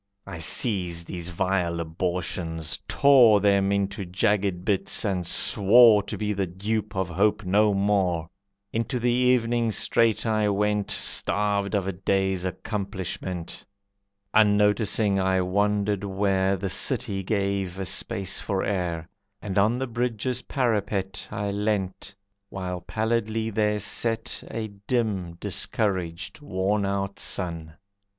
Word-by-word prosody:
I 80 - -8
seized 85 -1 +1
these 85 0 -5
vile 90 -1 -1
abortions, 85 -1 -3
tore 125 -7 +6
Them 100 -1 +2
into 100 0 -1
jagged 95 0 0
bits, 100 +2 0
and 90 -4 -1
swore 105 +4 +6
To 100 - -6
be 105 -1 -1
the 100 -1 -1
dupe 100 +5 -3
of 95 -2 0
hope 100 +4 +1
no 105 +2 +3
more. 95 -5 +1 0.5
Into 115 +3 -1
the 120 +1 +1
evening 120 -2 +2
straight 115 +3 +1
I 110 -2 +1
went, 105 0 0
Starved 100 0 0
of 100 -2 0
a 95 - -1
day's 95 0 -1
accomplishment. 95 -3 -5 0.7
Unnoticing, 105 -1 +3
I 95 0 +2
wandered 100 +1 0
where 95 -1 +1
The 95 - -3
city 95 -1 0
gave 100 -2 -1
a 95 - -3
space 95 +1 0
for 95 -2 -2
air, 85 -5 -2 0.3
And 100 -2 -5
on 110 +4 +3
the 130 - -2
bridge's 125 +1 -2
parapet 100 -6 -2
I 100 0 -3
leant, 100 -1 -2 0.3
while 90 -2 -5
pallidly 110 +2 -1
there 105 0 +1
set 115 +2 -1
A 110 -1 -4 0.2
dim, 105 -8 -1
discouraged, 95 - -3
worn 100 -4 -1
out 100 0 -3
sun. 85 -4 -1
100 Hz, 125 wpm, -25 LUFS, 95-105 Hz, 0.7 s, tore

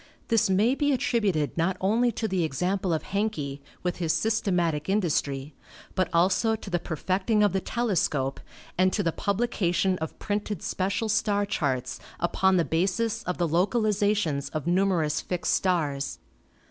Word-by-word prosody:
This 225 -2 +3
may 210 +6 +3
be 290 +1 +1
attributed 205 - 0
not 175 +3 0
only 230 +6 +2
to 220 - -2
the 185 -4 0
example 180 +5 -1
of 160 - 0
Hencke, 160 -10 -2 0.2
with 180 -1 -1
his 165 -3 0
systematic 180 -8 0
industry, 150 -7 0 0.4
but 185 -1 0
also 190 +6 +3
to 215 - -9
the 175 - +1
perfecting 190 +7 0
of 205 - +3
the 190 - +2
telescope 170 - 0 0.4
and 185 0 +4
to 205 - 0
the 165 - +1
publication 190 -3 0
of 160 0 -5
printed 205 0 -3
special 195 +4 -1
star 210 -1 +1
charts 135 -10 -2 0.2
upon 190 -1 +2
the 170 - +2
basis 200 +7 0
of 180 - -2
the 175 - +1
localizations 205 - +1
of 155 - -2
numerous 175 -4 +1
fixed 180 -1 -1
stars. 150 -7 0
185 Hz, 150 wpm, -27 LUFS, 165-210 Hz, 0.4 s, and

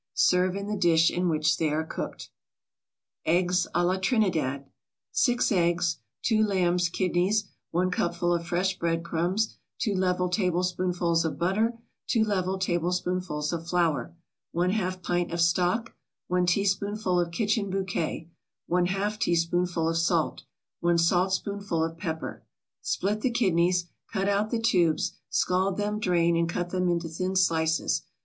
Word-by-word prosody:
Serve 180 - +3
in 200 0 -4
the 210 +1 -2
dish 165 -3 +4
in 180 0 0
which 155 0 +2
they 160 - +1
are 155 +2 0
cooked. 160 - -6 1.0
EGGS 180 +2 +2
A 175 - +3
LA 185 +2 +1
TRINIDAD 175 - 0 0.5
6 245 -3 +2
eggs 175 -2 +2 0.3
2 220 -2 +3
lamb's 180 -4 +1
kidneys 185 +4 0 0.2
1 180 +2 0
cupful 175 0 0
of 170 0 -2
fresh 185 +2 0
bread 165 0 0
crumbs 175 +6 -1 0.2
2 215 -4 0
level 180 -1 +1
tablespoonfuls 180 -2 0
of 160 - -2
butter 215 +7 +1 0.3
2 225 - +2
level 190 -3 0
tablespoonfuls 180 -3 -1
of 165 0 -4
flour 170 -2 0 0.4
1/2 185 +1 0
pint 175 0 -1
of 170 - -3
stock 180 +7 +1 0.4
1 180 0 +1
teaspoonful 200 0 +1
of 175 -1 0
kitchen 205 +3 0
bouquet 185 -4 -2 0.4
1/2 195 +4 0
teaspoonful 170 -2 +1
of 165 - 0
salt 165 -1 0 0.3
1 175 0 +2
saltspoonful 185 +1 +1
of 165 0 -3
pepper 160 -2 -5 0.4
Split 205 +3 -1
the 255 - +2
kidneys, 180 -6 +2 0.3
cut 195 -2 -1
out 205 +1 +1
the 235 - 0
tubes; 180 -8 +1
scald 185 +1 +1
them, 210 +1 -1
drain, 170 -4 +2
and 165 0 +1
cut 175 +1 -3
them 180 -1 0
into 170 -1 0
thin 185 +4 -3
slices. 160 -3 +2
180 Hz, 140 wpm, -27 LUFS, 170-195 Hz, 1.0 s, dish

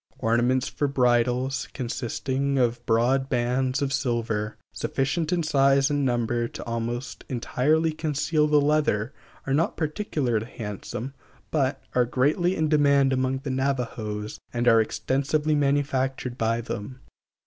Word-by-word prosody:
Ornaments 120 +3 +1
for 145 - -1
bridles, 125 0 +1
consisting 135 +2 -2
of 120 -1 +1
broad 125 +4 +2
bands 130 +2 0
of 135 -1 -1
silver, 115 -6 -1 0.2
sufficient 150 +5 -1
in 175 -2 +1
size 140 -2 +3
and 145 -1 +1
number 120 -2 0
to - - -8
almost 115 +2 -4
entirely 150 +6 +1
conceal 155 0 0
the 150 0 +4
leather, 145 -6 +1 0.3
are 135 - -1
not 160 +4 +1
particularly 145 - -1
handsome, 115 +3 -6 0.4
but 135 -3 0
are 125 -1 +3
greatly 145 +9 +1
in 160 -3 +1
demand 140 -3 +4
among 130 +1 0
the 140 - -3
Navajos 120 -6 -2
and 120 0 -1
are 115 -1 +7
extensively 140 +7 0
manufactured 135 -3 0
by 115 0 0
them. 120 +2 -6
130 Hz, 130 wpm, -25 LUFS, 120-145 Hz, 0.4 s, are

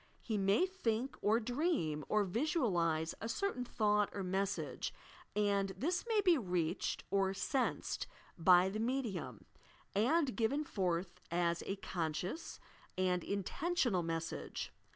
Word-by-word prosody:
He 220 - -3
may 195 - +3
think 265 -9 -1
or 220 +3 +4
dream 245 - 0
or 215 -1 +3
visualize 180 - +1
a 225 - -3
certain 395 -2 -1
thought 210 -3 +2
or 200 - -3
message, 185 -7 -1 0.4
and 200 -1 +2
this 345 - 0
may 440 -3 +3
be 355 -6 +5
reached 180 -4 -1
or 195 -1 +2
"sensed" 260 +5 -1 0.3
by 180 +1 +6
the 210 +3 -3
medium, 235 -4 -2 0.5
and 255 +6 +2
given 265 +6 +1
forth 180 - -2
as 170 0 +1
a 195 - -1
conscious 180 - -3 0.4
and 180 -2 +1
intentional 225 - 0
message. 165 -1 -4
205 Hz, 125 wpm, -36 LUFS, 180-255 Hz, 0.5 s, by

